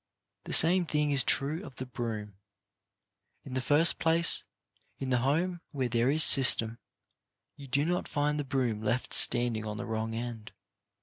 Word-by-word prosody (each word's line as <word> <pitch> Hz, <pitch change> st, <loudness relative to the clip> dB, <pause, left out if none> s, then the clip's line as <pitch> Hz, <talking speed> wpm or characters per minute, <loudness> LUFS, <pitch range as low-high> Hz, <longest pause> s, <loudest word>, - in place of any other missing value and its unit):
The -, -, -6 dB
same 175 Hz, +2 st, +4 dB
thing 150 Hz, -1 st, -1 dB
is 140 Hz, -2 st, +3 dB
true 150 Hz, +6 st, -2 dB
of 135 Hz, -, -13 dB
the 130 Hz, -, -8 dB
broom. 110 Hz, -5 st, -7 dB, 1.0 s
In 135 Hz, -, -11 dB
the 130 Hz, -, -3 dB
first 150 Hz, +6 st, +2 dB
place, 165 Hz, +1 st, +1 dB, 0.5 s
in 130 Hz, -1 st, -6 dB
the 125 Hz, -, +1 dB
home 165 Hz, +7 st, -2 dB
where 130 Hz, -4 st, -4 dB
there 120 Hz, +2 st, 0 dB
is 155 Hz, +2 st, +4 dB
system, 120 Hz, -4 st, +5 dB, 0.8 s
you 140 Hz, -, -13 dB
do 140 Hz, +3 st, -1 dB
not 175 Hz, +2 st, -3 dB
find 150 Hz, +1 st, -2 dB
the -, -, -3 dB
broom 130 Hz, -6 st, -3 dB
left 115 Hz, +3 st, -4 dB
standing 120 Hz, -2 st, +4 dB
on 105 Hz, -1 st, -7 dB
the 120 Hz, -, -7 dB
wrong 110 Hz, 0 st, -5 dB
end. 115 Hz, -2 st, -8 dB
130 Hz, 170 wpm, -28 LUFS, 115-150 Hz, 1.0 s, system